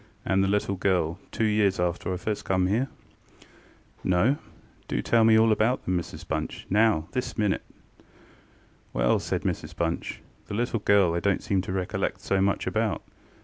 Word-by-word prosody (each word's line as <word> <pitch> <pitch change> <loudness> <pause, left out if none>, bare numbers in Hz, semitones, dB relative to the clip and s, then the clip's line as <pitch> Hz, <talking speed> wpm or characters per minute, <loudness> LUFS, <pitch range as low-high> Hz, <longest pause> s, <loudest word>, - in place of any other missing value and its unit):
and 95 0 +2
the - - +2
little 100 0 +1
girl, 90 -2 0
two - - -1
years 105 -3 +2
after 90 +1 -1
I 90 - -1
first 105 +3 -3
come 95 -1 +1
here? 110 +8 +1 1.2
ŌĆØ - - -2
ŌĆ£No. 110 +11 +3 0.5
Do - - -1
tell 115 -1 +4
me 110 0 +6
all 110 0 +5
about 110 +4 +1
them, 90 - 0
Mrs 85 0 -8
BunchŌĆönow, 85 +3 0
this 125 - -3
minute! 105 -3 +1 1.3
ŌĆØ - - -2
ŌĆ£Well, - - +4
ŌĆØ - - -4
said - - -2
Mrs - - -3
Bunch, 85 0 -3 0.3
ŌĆ£the 105 - -3
little 120 -1 0
girl 100 -4 +4
I 85 - 0
donŌĆÖt 100 +1 0
seem 95 -2 +1
to 95 - -6
recollect 95 -1 -2
so 95 -1 +1
much 100 -1 +1
about. - - -1
95 Hz, 180 wpm, -26 LUFS, 90-110 Hz, 1.3 s, me